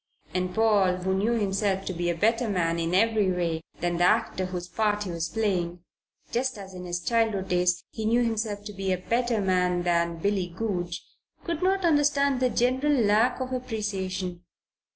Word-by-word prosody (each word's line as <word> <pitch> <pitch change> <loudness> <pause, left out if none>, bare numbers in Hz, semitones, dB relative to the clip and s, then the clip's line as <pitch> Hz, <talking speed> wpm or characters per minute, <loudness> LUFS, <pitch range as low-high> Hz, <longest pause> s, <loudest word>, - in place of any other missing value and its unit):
And 185 0 -2
Paul, 210 -5 +3
who 185 +1 -1
knew 205 +5 +1
himself 195 -2 0
to 185 - -3
be 175 0 -1
a 170 - 0
better 230 +5 +2
man 170 -4 0
in 165 +2 0
every 215 -1 +3
way 170 -3 -1 0.2
than 175 0 0
the 175 - +2
actor 190 -2 +1
whose 180 -1 -5
part 210 +1 0
he 185 - -5
was 165 -1 -3
playing, 180 -4 -1 0.5
just 255 0 -1
as 195 -1 -9
in 180 0 -8
his 175 0 -2
childhood 220 -5 +1
days 180 0 +2
he 220 - -5
knew 235 +2 +3
himself 220 -3 -2
to 210 0 -7
be 195 -1 -2
a 185 - +1
better 235 +4 0
man 180 -2 +1
than 170 -1 +1
Billy 195 +1 0
Goodge, 175 -2 -4 0.4
could 335 -3 -3
not 380 0 +2
understand 285 -4 +3
the 255 -1 +2
general 255 +5 +1
lack 230 0 +3
of 260 0 -3
appreciation. 195 -7 -3
195 Hz, 185 wpm, -27 LUFS, 180-230 Hz, 0.5 s, Paul